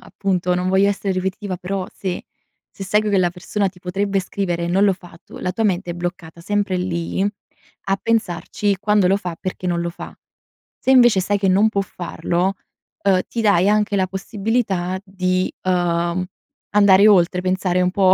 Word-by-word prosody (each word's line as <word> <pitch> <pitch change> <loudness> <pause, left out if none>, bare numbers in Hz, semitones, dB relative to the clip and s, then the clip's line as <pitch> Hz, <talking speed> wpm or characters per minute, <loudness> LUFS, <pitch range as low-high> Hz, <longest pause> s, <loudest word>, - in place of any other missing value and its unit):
appunto, 180 -2 -1
non 180 +1 -1
voglio 190 +1 +4
essere 200 -1 -1
ripetitiva 190 +1 -3
però 190 +1 -3
se 185 -2 -4 0.5
se 195 - -7
sai 210 +2 +2
che 205 -2 +1
la 175 -1 +2
persona 195 +3 -2
ti 180 -1 -15
potrebbe 195 +2 -1
scrivere 185 -3 -3
e 170 - -2
non 195 +3 +3
lo 195 - +4
fa, 175 -2 -12
tu, - - -12
la 180 - -2
tua 220 +5 -2
mente 185 -3 0
è - - -2
bloccata 175 -1 -6
sempre 205 +1 -1
lì, 175 -1 -2 0.7
a 195 0 +1
pensarci 205 -2 0
quando 210 -2 +3
lo 195 - +4
fa, 180 -4 -5
perché 185 -1 -5
non 170 -1 0
lo 170 0 -2
fa. - - -10 0.6
Se 265 - -1
invece 240 -6 +6
sai 205 +2 0
che 195 -1 +1
non 200 +4 +4
può 200 -2 -1
farlo, 180 0 -2 0.5
uhm, 190 -2 +4
ti 235 - -3
dai 200 -2 +4
anche 210 -1 +2
la 190 -1 +2
possibilità 195 -1 -2
di, 185 -1 -1
uhm, 175 -1 0 0.5
andare 200 0 +6
oltre, 180 -2 +4
pensare 185 -1 0
un 180 - +2
po' 190 -1 +4
190 Hz, 185 wpm, -20 LUFS, 180-200 Hz, 0.7 s, invece